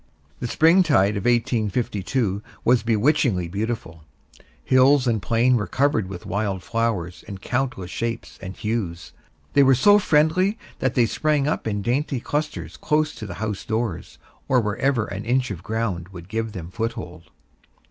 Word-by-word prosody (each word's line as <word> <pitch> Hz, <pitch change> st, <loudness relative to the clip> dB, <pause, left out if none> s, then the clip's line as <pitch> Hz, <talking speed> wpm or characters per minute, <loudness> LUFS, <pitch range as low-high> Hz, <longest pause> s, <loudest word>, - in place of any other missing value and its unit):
The 120 Hz, -, -3 dB
spring 165 Hz, +9 st, +5 dB
tide 110 Hz, -, +3 dB
of 100 Hz, -, -4 dB
1852 115 Hz, -2 st, 0 dB, 0.2 s
was 125 Hz, 0 st, +4 dB
bewitchingly 115 Hz, -, +2 dB
beautiful; 100 Hz, -4 st, -4 dB, 0.6 s
hills 130 Hz, +1 st, +4 dB
and 115 Hz, -4 st, +1 dB
plain 120 Hz, +3 st, +3 dB
were 105 Hz, -, -2 dB
covered 130 Hz, -8 st, +1 dB
with 90 Hz, -2 st, -8 dB
wild 100 Hz, -2 st, -2 dB
flowers 105 Hz, -6 st, -2 dB
in 100 Hz, -, -6 dB
countless 125 Hz, -5 st, -3 dB
shapes 115 Hz, 0 st, -4 dB
and 95 Hz, -1 st, -7 dB
hues. 105 Hz, -7 st, -3 dB, 0.4 s
They 145 Hz, -, +5 dB
were 135 Hz, -1 st, +6 dB
so 205 Hz, +11 st, +6 dB
friendly 185 Hz, +5 st, +2 dB, 0.2 s
that 130 Hz, -, 0 dB
they 120 Hz, -, +4 dB
sprang 140 Hz, +5 st, 0 dB
up 150 Hz, -, -1 dB
in 100 Hz, -2 st, -2 dB
dainty 135 Hz, +4 st, 0 dB
clusters 120 Hz, -, -3 dB
close 150 Hz, 0 st, 0 dB
to 110 Hz, -, -8 dB
the -, -, -7 dB
house 105 Hz, -1 st, -4 dB
doors, 110 Hz, -5 st, -3 dB, 0.3 s
or 130 Hz, -, +4 dB
wherever 115 Hz, +2 st, 0 dB
an 100 Hz, +1 st, -6 dB
inch 125 Hz, 0 st, 0 dB
of 90 Hz, -4 st, -6 dB
ground 95 Hz, -4 st, -3 dB
would 90 Hz, -1 st, -11 dB
give 110 Hz, 0 st, -3 dB
them 90 Hz, -3 st, -7 dB
foothold. 90 Hz, -6 st, -5 dB
115 Hz, 155 wpm, -23 LUFS, 100-130 Hz, 0.6 s, were